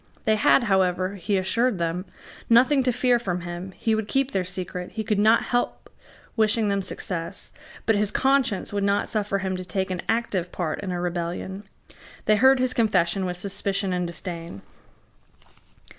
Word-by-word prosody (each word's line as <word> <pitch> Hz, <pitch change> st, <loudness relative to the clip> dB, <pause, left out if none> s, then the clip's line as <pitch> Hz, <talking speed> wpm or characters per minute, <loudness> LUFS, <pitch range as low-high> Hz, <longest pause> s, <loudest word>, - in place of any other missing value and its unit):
They 220 Hz, -, +4 dB
had, 215 Hz, +4 st, +4 dB
however, 185 Hz, -2 st, +1 dB
he 200 Hz, +1 st, -1 dB
assured 220 Hz, +4 st, +1 dB
them, 170 Hz, +2 st, -2 dB, 0.4 s
nothing 255 Hz, +4 st, +5 dB
to 250 Hz, -1 st, +2 dB
fear 250 Hz, 0 st, +2 dB
from 180 Hz, -6 st, -3 dB
him: 175 Hz, +2 st, -6 dB
he 225 Hz, -, 0 dB
would 220 Hz, -1 st, -1 dB
keep 270 Hz, +2 st, +1 dB
their 190 Hz, -, 0 dB
secret; 180 Hz, -1 st, -5 dB
he 220 Hz, -, -3 dB
could 210 Hz, -2 st, 0 dB
not 220 Hz, +2 st, +5 dB
help 245 Hz, 0 st, -2 dB, 0.4 s
wishing 220 Hz, -1 st, +2 dB
them 200 Hz, 0 st, +1 dB
success; 180 Hz, -1 st, -4 dB, 0.3 s
but 225 Hz, -, +3 dB
his 205 Hz, 0 st, +1 dB
conscience 265 Hz, -8 st, +1 dB
would 200 Hz, -1 st, 0 dB
not 200 Hz, 0 st, +1 dB
suffer 205 Hz, -2 st, 0 dB
him 190 Hz, -1 st, -2 dB
to 185 Hz, -, -5 dB
take 190 Hz, 0 st, -2 dB
an 180 Hz, -, -2 dB
active 205 Hz, -6 st, 0 dB
part 165 Hz, -4 st, -3 dB
in 195 Hz, -2 st, -4 dB
a 175 Hz, -, -2 dB
rebellion. 175 Hz, +3 st, -4 dB, 0.6 s
They 215 Hz, -, +4 dB
heard 265 Hz, +3 st, +6 dB
his 255 Hz, 0 st, 0 dB
confession 190 Hz, -4 st, +2 dB
with 180 Hz, 0 st, -4 dB
suspicion 195 Hz, 0 st, -2 dB
and 180 Hz, -1 st, -1 dB
disdain. 170 Hz, -, -7 dB
195 Hz, 175 wpm, -25 LUFS, 180-220 Hz, 0.6 s, heard